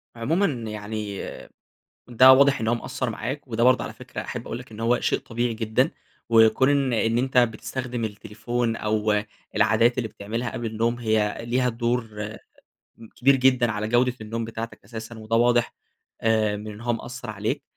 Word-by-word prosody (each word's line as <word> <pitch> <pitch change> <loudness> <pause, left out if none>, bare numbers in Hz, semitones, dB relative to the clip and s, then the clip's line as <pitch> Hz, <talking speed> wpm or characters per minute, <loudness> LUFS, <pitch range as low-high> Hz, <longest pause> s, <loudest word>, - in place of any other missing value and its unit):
عمومًا 160 +12 +1 0.2
يعني 105 -1 -5 0.9
ده 130 +2 +8
واضح 140 0 +5
إن 110 - -1
هو 120 - +3
مأثّر 120 +1 -3
معاك، 135 +5 -5
وده 115 +1 0
برضه 130 0 +4
على - - -6
فكرة - - -8
أحب - - -6
أقول - - -4
لَك - - -12
إن 110 - -9
هو 115 +2 +2
شيء - - +1
طبيعي 120 -1 -2
جدًا، 110 -1 +1 0.4
وكون 115 +3 +5
إن 140 -3 +2
إن 115 +1 +1
أنت 130 0 +1
بتستخدم 120 +1 -1
التليفون 110 +2 -3
أو 105 -1 +1 0.3
العادات 110 +3 +3
اللي 115 - -1
بتعملها 115 +4 -4
قبل 120 - -4
النوم 115 +2 0
هي 110 -2 +1
ليها 125 +2 0
دور 115 -3 -2 0.9
كبير 135 +2 +4
جدًا 125 -2 +3
على 105 0 -2
جودة 125 +1 +2
النوم 115 +1 -4
بتاعتك 115 0 -7
أساسًا، 115 0 -8
وده 110 +1 -1
واضح 120 0 +3 0.5
آآ 110 -2 +2
من 105 +1 -7
إن 105 - -11
هو 120 0 0
مأثّر 120 0 -6
عليك، 105 0 -3
115 Hz, 170 wpm, -24 LUFS, 110-120 Hz, 0.9 s, ده